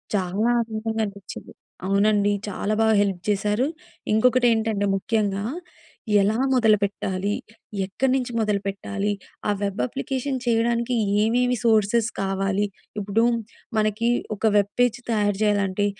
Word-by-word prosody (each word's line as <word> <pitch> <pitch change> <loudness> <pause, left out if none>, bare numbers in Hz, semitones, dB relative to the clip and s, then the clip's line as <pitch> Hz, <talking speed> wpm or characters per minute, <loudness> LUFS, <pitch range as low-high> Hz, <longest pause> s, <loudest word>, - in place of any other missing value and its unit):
చాలా 195 +5 0
ఆనందంగా 220 0 -2
అనిపిచ్చింది. 200 -2 -9 0.4
అవునండి. 205 +1 +3 0.2
చాలా 205 +1 -2
బాగా 220 -1 +4
హెల్ప్ 195 -3 -1
చేశారు. 210 +5 +1 0.5
ఇంకొకటేంటంటే 225 -3 +3
ముఖ్యంగా 200 -1 -1 0.8
ఎలా 210 +3 +1 0.2
మొదలుపెట్టాలి? 205 -4 +1 0.5
ఎక్కడ్నుంచి 255 +4 0
మొదలుపెట్టాలి? 200 -1 -1 0.4
ఆ - - +4
వెబ్ 200 -7 -1
అప్లికేషన్ 260 - -3
చేయడానికి 235 +1 +1 0.3
ఏమేమి 245 +2 +2
సోర్సెస్ 225 0 +3
కావాలి? 195 +1 0 0.3
ఇప్పుడు 210 +3 +1 0.5
మనకి 215 +2 +1 0.3
ఒక 205 - -16
వెబ్ 200 0 +2
పేజ్ 245 -1 +3
తయారు 205 -3 +1
జేయాలంటే, 205 -1 +1
210 Hz, 105 wpm, -24 LUFS, 200-230 Hz, 0.8 s, బాగా